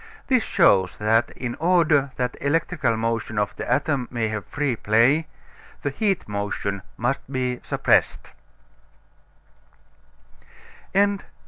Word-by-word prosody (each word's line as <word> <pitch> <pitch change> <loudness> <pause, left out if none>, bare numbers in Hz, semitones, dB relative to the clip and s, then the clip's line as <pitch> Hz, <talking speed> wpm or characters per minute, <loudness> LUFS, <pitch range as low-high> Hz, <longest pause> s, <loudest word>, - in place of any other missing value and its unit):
This 255 -3 +3
shows 95 - +3
that, 110 +2 +2
in 120 -2 -4
order 165 -5 +3
that 125 -1 -2
electrical 140 -4 0
motion 115 -1 -2
of 105 -1 -1
the - - -5
atom 140 -2 0
may 115 -3 -1
have 110 -3 -5
free 145 -4 -1
play, 120 +10 +3 0.6
the 145 - -1
heat 200 +2 -1
motion 100 -1 -3 0.2
must 120 +4 -1
be 125 -2 -2
suppressed. - - +1
125 Hz, 110 wpm, -23 LUFS, 110-150 Hz, 0.6 s, This